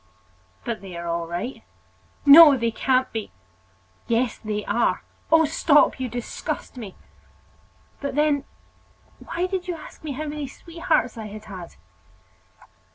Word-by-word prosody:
"But 235 -2 -3
they 185 -3 -8
are 170 - -6
all 170 0 -2
right." 175 +10 -5 0.6
"No, 290 0 +10
they 230 -1 0
can't 255 +2 +1
be!" 220 -2 -5 0.8
"Yes, 235 0 0
they 210 -1 -4
are!" 230 +4 +1 0.3
"Oh, 320 0 +6
stop; 295 -1 +3
you 255 -1 -2
disgust 240 +3 -5
me!" 215 -7 -8 1.0
"But 280 -2 -4
then, 295 -2 +2 0.7
why 350 +1 -3
did 370 -1 -3
you 355 - -2
ask 315 - -13
me 300 -3 -4
how 305 +4 -4
many 295 -1 -4
sweethearts 265 -6 -2
I 215 - -6
had 210 +1 -10
had?" 185 -5 -9
255 Hz, 140 wpm, -24 LUFS, 215-300 Hz, 1.0 s, No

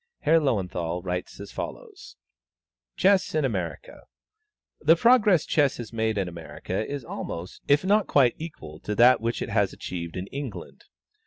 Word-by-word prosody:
Herr 165 +2 +4
Löwenthal 90 - -2
writes 90 +1 -4
as 100 0 -9
follows: - - -8 0.8
"CHESS 190 -3 +3
IN 155 -3 +2
AMERICA. 95 -9 -4 0.8
The 160 +2 +5
progress 210 - +4
Chess 145 -3 +2
has 120 -1 -8
made 110 -1 0
in 95 -2 0
America 90 +3 -5
is 140 -3 -5
almost, 85 -5 -6
if 145 +5 +3
not 205 +2 +3
quite, 130 -4 +4
equal 150 - -9
to 105 - -4
that 120 +3 +6
which 115 +1 -2
it - - -6
has - - +1
achieved 85 -1 -6
in 90 - -4
England. 135 -5 -7
115 Hz, 155 wpm, -26 LUFS, 90-150 Hz, 0.8 s, that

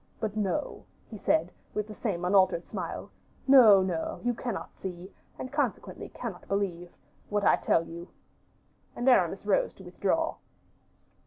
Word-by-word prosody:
But 215 -2 -3
no," 210 - -2 0.3
he 215 - -7
said, 165 0 +1 0.2
with 210 - 0
the 215 - -8
same 190 -5 -2
unaltered 185 -2 +3
smile, - - -5 0.4
"no, 225 -8 +8
no, 175 -3 -2
you 245 0 +1
cannot 235 -3 -5
see, 185 0 -8 0.2
and 260 +2 -7
consequently 290 0 -2
cannot - - -7
believe 180 -3 -2 0.4
what 205 0 0
I - - +6
tell 165 - +2
you." 170 +1 -9 0.9
And 245 - -3
Aramis 195 -6 +4
rose 205 -2 +1
to 190 - -13
withdraw. 200 - -1
200 Hz, 145 wpm, -29 LUFS, 180-225 Hz, 0.9 s, no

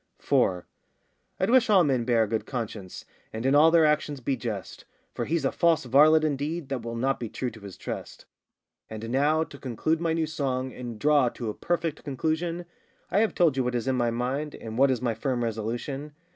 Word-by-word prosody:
4. 90 -2 +1 0.7
I'd 190 +4 +1
wish 255 -2 +5
all 195 -4 +6
men 130 -6 +1
bear 115 -2 +3
a - - -1
good 110 +1 -2
conscience, 110 -7 -6 0.3
And 110 +3 -5
in 135 - +3
all 150 +3 +7
their 165 -1 +5
actions 150 -2 +1
be 130 +2 -1
just; 110 -7 -6 0.3
For - - -3
he's 160 -2 -1
a - - +2
false 170 -5 +2
varlet 155 +5 +6
indeed 150 +1 -2
That 135 -3 -2
will 115 0 -5
not 135 +3 0
be 115 - -4
true 125 +2 -3
to 110 - -13
his 100 -3 -10
trust. - - -7 0.6
And 110 +1 -6
now 150 +4 +2
to 140 -3 -12
conclude 150 +6 -1
my 165 -1 +1
new 165 -1 +1
song, 130 -5 -2
And 120 -3 -7
draw 145 0 +3
to 115 -2 -5
a - - -8
perfect 165 +1 -2
conclusion, 160 +5 -2 0.5
I 190 - +3
have 220 0 +1
told 165 -6 +3
you 130 - +1
what 125 0 -1
is 120 +1 -2
in 130 - +2
my 120 -2 +1
mind, 130 +6 -2
And 110 -1 -8
what 135 +3 +4
is 125 -2 0
my 120 -2 +1
[firm] 120 +1 -2
resolution. 120 +6 -4
135 Hz, 215 wpm, -27 LUFS, 120-155 Hz, 0.7 s, all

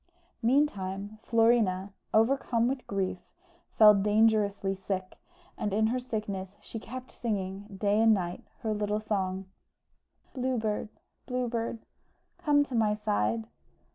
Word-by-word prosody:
Meantime 215 -6 0
Florina, 225 -5 +2 0.2
overcome 235 0 +3
with 260 0 -3
grief, 190 -2 -1 0.6
fell 210 -1 +9
dangerously 205 -1 +2
sick, 190 -1 -4 0.5
and 205 -1 -1
in 220 +1 +3
her 245 +3 +1
sickness 205 -5 -4
she 225 - -7
kept 255 +3 -8
singing, 200 -3 -3
day 205 +2 +2
and 225 0 +6
night, 175 -2 -4 0.2
her 220 -1 -1
little 210 0 -1
song 195 -3 -2 0.9
"Blue 255 -1 -1
Bird, 215 -1 -2 0.4
Blue 250 -1 -1
Bird, 230 -1 -3 0.5
Come 295 -4 +4
to 275 - -9
my 215 -3 +2
side." 110 - 0
215 Hz, 125 wpm, -29 LUFS, 195-230 Hz, 0.9 s, fell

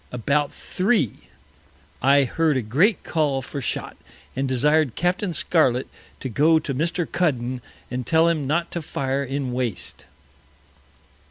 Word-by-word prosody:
About 140 +5 0
Three, 185 - -1 0.7
I 140 +1 +5
heard 150 +3 +1
a 130 - -1
great 160 - +2
Call 145 -4 0
for 140 +2 -5
Shot, - - -3 0.4
and 135 +1 -1
desired 145 +1 +2
Capt. 180 +3 0
Scarlet 130 -6 +2 0.3
to - - -3
go 150 +7 +4
to 150 -3 -2
Mr. 170 +5 0
Cuddon, 130 -8 -1 0.3
and 125 0 -2
tell 160 +4 +3
him 155 -5 0
not 170 +4 0
to 170 - -3
fire 140 -2 -2
in 135 -1 -3
Waste. 120 -6 -3
140 Hz, 140 wpm, -23 LUFS, 130-165 Hz, 0.7 s, I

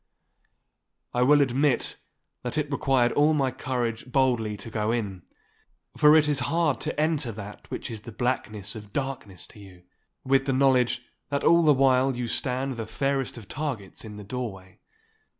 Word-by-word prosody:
I 125 - +1
will 145 +3 +6
admit 135 0 +1 0.4
that 125 +3 -3
it 150 -1 -1
required 135 -3 +2
all 150 +2 +3
my 135 -3 +1
courage 125 -2 -3
boldly 120 -6 +1
to 105 +3 -9
go 110 0 0
in, 100 -6 -2 0.7
for 150 +1 +6
it 155 -1 +5
is 145 -2 +2
hard 165 -4 +1
to - - -3
enter 150 -5 +1
that 105 0 -10
which - - -5
is 110 -2 -6
the 115 +2 -9
blackness 110 -4 -2
of 105 -3 -10
darkness 115 - -4
to 105 - -15
you, 95 -3 -14 0.4
with 135 +1 +2
the 135 - +2
knowledge 130 -2 +3 0.3
that 140 0 -1
all 170 +1 +6
the 155 -2 +5
while 130 -1 +3
you 125 - -2
stand 130 +2 -2
the 115 -1 -4
fairest 135 +3 -1
of 110 -5 -10
targets 130 -9 -4
in 105 -2 -9
the 105 - -8
doorway. 100 -4 -6
125 Hz, 170 wpm, -26 LUFS, 110-135 Hz, 0.7 s, will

